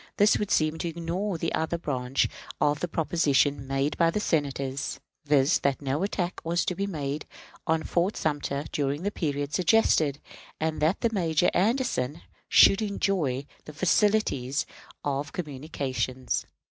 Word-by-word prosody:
This 205 Hz, +1 st, +5 dB
would 210 Hz, -, -2 dB
seem 155 Hz, +1 st, +2 dB
to 170 Hz, -, -2 dB
ignore 170 Hz, +4 st, -3 dB
the 165 Hz, 0 st, -2 dB
other 160 Hz, +2 st, 0 dB
branch 130 Hz, -5 st, 0 dB, 0.3 s
of 145 Hz, -1 st, +2 dB
the 175 Hz, -, -1 dB
proposition 145 Hz, -4 st, +1 dB
made 135 Hz, +2 st, 0 dB
by 165 Hz, -1 st, +5 dB
the 190 Hz, -, -1 dB
Senators, 140 Hz, -6 st, -1 dB, 0.3 s
viz., 145 Hz, +1 st, +4 dB
that 140 Hz, -1 st, 0 dB
no 140 Hz, +2 st, -1 dB
attack 190 Hz, -2 st, -2 dB
was 170 Hz, +1 st, 0 dB
to -, -, 0 dB
be 200 Hz, +2 st, -2 dB
made 150 Hz, -5 st, -4 dB, 0.4 s
on 160 Hz, 0 st, +2 dB
Fort 180 Hz, +4 st, 0 dB
Sumter 145 Hz, -2 st, -1 dB
during 145 Hz, +2 st, -1 dB
the 205 Hz, -, 0 dB
period 145 Hz, -5 st, -2 dB
suggested, 160 Hz, -6 st, +3 dB, 0.4 s
and 160 Hz, -1 st, -1 dB
that 200 Hz, +9 st, +1 dB
Major 170 Hz, -3 st, +2 dB
Anderson 180 Hz, -, 0 dB, 0.3 s
should 195 Hz, -, +7 dB
enjoy 185 Hz, -10 st, 0 dB, 0.2 s
the 150 Hz, -, -9 dB
facilities 170 Hz, -, +1 dB, 0.4 s
of 145 Hz, 0 st, -2 dB
communication, 135 Hz, -4 st, -3 dB
etc. -, -, -2 dB
155 Hz, 145 wpm, -27 LUFS, 140-180 Hz, 0.4 s, should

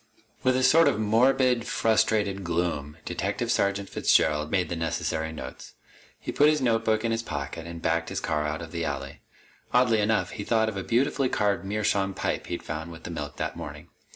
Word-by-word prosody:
With 130 Hz, -1 st, +3 dB
a 130 Hz, -, +1 dB
sort 165 Hz, +5 st, +6 dB
of -, -, +2 dB
morbid, 120 Hz, +2 st, +3 dB
frustrated 105 Hz, -3 st, +1 dB
gloom, 85 Hz, -4 st, -2 dB
Detective -, -, -2 dB
Sergeant 100 Hz, 0 st, +1 dB
Fitzgerald 75 Hz, -3 st, +2 dB
made 90 Hz, 0 st, 0 dB
the 85 Hz, -, -2 dB
necessary 80 Hz, -1 st, -2 dB
notes. 80 Hz, -, -9 dB, 0.4 s
He -, -, -5 dB
put 145 Hz, +1 st, +5 dB
his 155 Hz, 0 st, +2 dB
notebook 115 Hz, -3 st, +1 dB
in 115 Hz, -, +1 dB
his 115 Hz, 0 st, 0 dB
pocket 80 Hz, -2 st, -5 dB
and 85 Hz, -1 st, -8 dB
backed 85 Hz, 0 st, 0 dB
his -, -, -2 dB
car 75 Hz, -2 st, -1 dB
out 75 Hz, +2 st, -3 dB
of 80 Hz, -, -9 dB
the 85 Hz, -1 st, -3 dB
alley. 70 Hz, 0 st, -4 dB, 0.5 s
Oddly 125 Hz, -3 st, +4 dB
enough, 110 Hz, +1 st, +1 dB
he 105 Hz, -, -5 dB
thought 110 Hz, 0 st, +2 dB
of 110 Hz, -, -6 dB
a 95 Hz, -, -2 dB
beautifully 130 Hz, +4 st, +1 dB
carved 100 Hz, -5 st, +1 dB
meerschaum 100 Hz, -1 st, 0 dB
pipe -, -, -2 dB
he'd 85 Hz, -, -4 dB
found 80 Hz, +3 st, -5 dB
with 80 Hz, -, -11 dB
the -, -, -6 dB
milk 75 Hz, -3 st, -5 dB
that -, -, -3 dB
morning. -, -, -8 dB
100 Hz, 195 wpm, -27 LUFS, 80-115 Hz, 0.5 s, sort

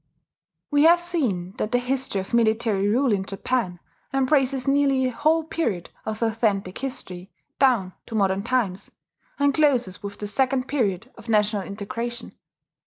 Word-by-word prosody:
] -, -, -59 dB
We 290 Hz, +1 st, +4 dB
have 340 Hz, +1 st, +7 dB
seen 250 Hz, -, -1 dB
that 215 Hz, -, -2 dB
the 245 Hz, -, +3 dB
history 250 Hz, -4 st, -1 dB
of 190 Hz, -, -11 dB
military 220 Hz, -3 st, +2 dB
rule 245 Hz, +4 st, +2 dB
in 195 Hz, -2 st, 0 dB
Japan 195 Hz, -1 st, -2 dB, 0.3 s
embraces 270 Hz, -1 st, +1 dB
nearly 275 Hz, -1 st, +3 dB
the 255 Hz, -, 0 dB
whole 310 Hz, +6 st, +2 dB
period 235 Hz, -, -2 dB, 0.2 s
of 220 Hz, +1 st, -2 dB
authentic 210 Hz, -4 st, 0 dB
history, 200 Hz, -9 st, -5 dB, 0.3 s
down 235 Hz, -9 st, +3 dB
to 225 Hz, -, -6 dB
modern 195 Hz, -2 st, +2 dB
times, 205 Hz, -5 st, -1 dB, 0.5 s
and 285 Hz, 0 st, +3 dB
closes 255 Hz, -11 st, +2 dB
with 200 Hz, 0 st, -7 dB
the 210 Hz, -, -5 dB
second 255 Hz, +5 st, +1 dB
period 230 Hz, -4 st, -1 dB
of 230 Hz, -, -12 dB
national 210 Hz, -1 st, +2 dB
integration. 230 Hz, +5 st, -5 dB
235 Hz, 155 wpm, -24 LUFS, 200-270 Hz, 0.5 s, have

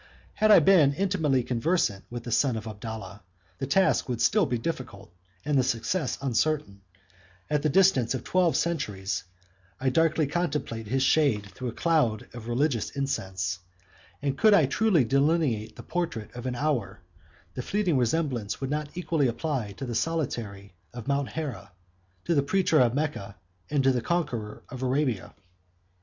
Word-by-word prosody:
Had 215 Hz, -, +2 dB
I 210 Hz, -, +9 dB
been 165 Hz, -8 st, +5 dB
intimately 160 Hz, -9 st, +1 dB
conversant 120 Hz, -, 0 dB
with 120 Hz, 0 st, -6 dB
the 120 Hz, -, -6 dB
son 130 Hz, +1 st, +2 dB
of 110 Hz, -, -6 dB
Abdallah, 110 Hz, -1 st, -7 dB, 0.4 s
the 135 Hz, -, -3 dB
task 190 Hz, -1 st, +2 dB
would 120 Hz, -2 st, -2 dB
still 205 Hz, -, +3 dB
be 120 Hz, -, 0 dB
difficult, 115 Hz, -, -6 dB, 0.3 s
and 145 Hz, -2 st, +2 dB
the -, -, +3 dB
success 130 Hz, +6 st, -1 dB
uncertain: 135 Hz, -5 st, 0 dB, 0.7 s
at 150 Hz, -1 st, +2 dB
the 155 Hz, -, +1 dB
distance 135 Hz, -8 st, +3 dB
of 130 Hz, -, -5 dB
twelve 180 Hz, -3 st, +2 dB
centuries, 105 Hz, -, -2 dB, 0.5 s
I 130 Hz, 0 st, +1 dB
darkly 160 Hz, +1 st, +2 dB
contemplate 150 Hz, -8 st, -2 dB
his 130 Hz, +4 st, +1 dB
shade 135 Hz, -8 st, +3 dB
through 130 Hz, -, -6 dB
a -, -, -2 dB
cloud 150 Hz, -11 st, +1 dB
of 120 Hz, -2 st, -9 dB
religious 120 Hz, 0 st, 0 dB
incense; 95 Hz, -10 st, -3 dB, 0.6 s
and 140 Hz, -1 st, 0 dB
could 215 Hz, +6 st, +5 dB
I 160 Hz, -, +5 dB
truly 180 Hz, +2 st, +3 dB
delineate 135 Hz, -4 st, +1 dB
the -, -, -10 dB
portrait 165 Hz, -12 st, -3 dB
of 120 Hz, +1 st, -6 dB
an 125 Hz, -, -2 dB
hour, 120 Hz, -8 st, -1 dB, 0.5 s
the 125 Hz, -, -4 dB
fleeting 190 Hz, +2 st, 0 dB
resemblance 125 Hz, -4 st, -1 dB
would 135 Hz, 0 st, -3 dB
not 150 Hz, 0 st, -2 dB
equally 165 Hz, -6 st, +1 dB
apply 120 Hz, -4 st, -2 dB
to 135 Hz, -, -6 dB
the 120 Hz, -, -4 dB
solitary 115 Hz, -, -3 dB, 0.2 s
of 120 Hz, -1 st, -7 dB
Mount 140 Hz, -1 st, 0 dB
Hera, 145 Hz, -, -6 dB, 0.5 s
to 170 Hz, -, +1 dB
the 145 Hz, -, +3 dB
preacher 165 Hz, +2 st, +2 dB
of 120 Hz, -1 st, +3 dB
Mecca, 140 Hz, -10 st, -3 dB, 0.3 s
and 145 Hz, -2 st, +1 dB
to 135 Hz, -, +5 dB
the 125 Hz, -2 st, 0 dB
conqueror 120 Hz, -12 st, -2 dB
of 130 Hz, 0 st, -8 dB
Arabia. 130 Hz, -4 st, -1 dB
135 Hz, 165 wpm, -27 LUFS, 115-155 Hz, 0.7 s, I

